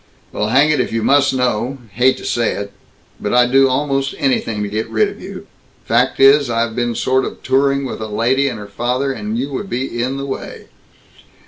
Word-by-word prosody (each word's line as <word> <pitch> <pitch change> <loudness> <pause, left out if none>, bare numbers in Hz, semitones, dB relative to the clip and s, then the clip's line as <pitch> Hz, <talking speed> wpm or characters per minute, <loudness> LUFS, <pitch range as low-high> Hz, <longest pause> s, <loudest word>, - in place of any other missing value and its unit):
"Well, 105 - -2
hang 135 +7 +4
it, 150 - +1
if 125 - -1
you 115 -1 -1
must 140 0 +4
know 125 0 -1
Hate 125 +6 +2
to - - -10
say 120 -2 0
it, 100 0 -6 0.5
but 105 - -1
I'd 125 0 +4
do 135 0 +5
almost 135 0 -1
anything 115 -5 0
to - - -2
get 110 +2 -3
rid 110 -1 +2
of - - -12
you. - - -9 0.4
Fact 120 +3 +1
is, 135 0 +6
I've 115 -1 -1
been 120 -1 -1
sort 130 +3 +1
of - - -7
touring 140 +1 +1
with 130 - -6
a 110 - -4
lady 120 +6 +1
and 125 - -3
her 105 - -8
father, 125 +6 -2
and 110 -1 -4
you 135 +4 -3
would 195 +9 -5
be 120 -1 -3
in 130 +3 -2
the 140 - -4
way!" 135 - -7
125 Hz, 215 wpm, -18 LUFS, 115-135 Hz, 0.5 s, is